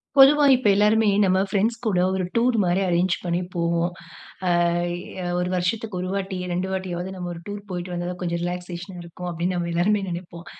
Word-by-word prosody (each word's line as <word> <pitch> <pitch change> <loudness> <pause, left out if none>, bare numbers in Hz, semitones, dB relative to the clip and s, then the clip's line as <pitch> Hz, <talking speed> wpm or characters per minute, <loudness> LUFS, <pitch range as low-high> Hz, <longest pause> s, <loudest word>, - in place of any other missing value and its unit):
பொதுவா 285 +2 +7
இப்ப 250 -3 0
எல்லோருமே 215 +2 +4 0.2
நம்ம 190 -1 +3
ஃபிரெண்ட்ஸ் 220 +4 +1
கூட 195 -5 +2
ஒரு 190 - -1
டூர் 240 +1 +3
மாரி 180 +2 +1
அரேஞ்சு 175 +1 +2
பண்ணி 175 0 0
போவோம். 170 0 +1 0.6
அ - - +3 0.9
ஒரு 180 - -1
வருஷத்துக்கு 190 +3 -1
1 185 - -3
வாட்டி, 195 -1 -3 0.2
2 180 +2 -1
வாட்டியாவது 185 -1 -3
நம்ம 180 -1 -5
ஒரு 170 - -9
டூர் 205 0 -5
போயிட்டு 180 0 -4
வந்தா 175 0 -3
தான் 180 - -9
கொஞ்சம் 170 -1 -2
ரிலாக்சேஷன் 180 +1 -5
இருக்கும், 170 +1 -8
அப்பிடின்னு 175 +2 -2
நம்ம 170 -1 -2
எல்லாருமே 200 +5 +2
நினைப்போம். 170 -1 -7
180 Hz, 180 wpm, -24 LUFS, 175-200 Hz, 0.9 s, பொதுவா